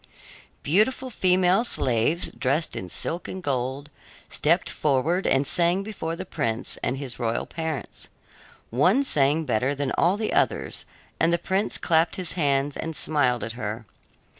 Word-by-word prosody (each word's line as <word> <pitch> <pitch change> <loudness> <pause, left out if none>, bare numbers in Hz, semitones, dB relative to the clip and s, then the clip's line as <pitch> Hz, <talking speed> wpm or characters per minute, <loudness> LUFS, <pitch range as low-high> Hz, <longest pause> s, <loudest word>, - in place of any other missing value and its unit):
Beautiful 220 - +1
female 185 +1 +3
slaves, 135 - +1
dressed 140 +4 -1
in 90 - -5
silk 170 - -3
and 185 -1 -7
gold, 135 +2 -2 0.4
stepped 170 +4 +1
forward 155 +6 0
and 135 +1 +3
sang 175 +5 +2
before 190 -6 -4
the 185 +2 -6
prince 130 -8 -2
and 130 - -1
his 135 -3 -5
royal 115 -1 -1
parents. 160 -3 -5 0.6
One 180 - +3
sang 150 - +3
better 125 +3 0
than 140 -1 -2
all 180 +4 +3
the 215 0 -2
others, - - 0 0.3
and 165 - +3
the 170 - +3
prince 190 +4 -1
clapped 165 -1 +2
his 180 -3 -4
hands 140 -3 +1
and 160 -1 -4
smiled 130 -7 +1
at 115 - -4
her. 110 -1 -5
155 Hz, 150 wpm, -25 LUFS, 130-180 Hz, 0.6 s, female